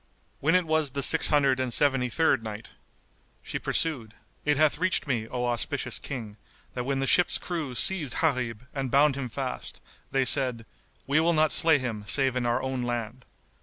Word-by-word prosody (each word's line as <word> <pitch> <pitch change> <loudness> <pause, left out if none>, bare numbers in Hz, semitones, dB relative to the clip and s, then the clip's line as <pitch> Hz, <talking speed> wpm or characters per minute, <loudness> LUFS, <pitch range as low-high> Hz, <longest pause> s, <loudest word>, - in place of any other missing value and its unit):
When 160 +5 +2
it 185 -1 +2
was 155 -2 0
the 140 -1 -2
Six - - +4
Hundred 140 -3 +2
and 130 -1 -2
Seventy 135 -1 +2
third 160 -4 +1
Night, 110 0 -8 0.7
She - - -4
pursued, 125 -9 0 0.3
It 150 -1 +2
hath 155 0 +2
reached 185 -4 0
me, 120 -6 -2
O 125 +1 -3
auspicious 120 -2 -1
King, 110 -6 -6 0.4
that 125 -1 -4
when 135 0 -1
the 135 - 0
ship's 175 +7 +4
crew 160 -8 -5
seized 160 -2 +1
Gharib 125 -7 -1
and 135 -2 -3
bound 140 +2 +3
him 135 -3 -5
fast 130 +2 -4 0.3
they 135 -1 0
said, 125 -5 +2 0.4
"We 140 +3 +2
will 170 +2 +2
not 155 -1 +2
slay 165 -3 +4
him 120 -6 -5
save 135 +2 +3
in 125 -1 -1
our 120 - 0
own 130 -1 -3
land." 120 0 -5
135 Hz, 185 wpm, -26 LUFS, 120-150 Hz, 0.7 s, Six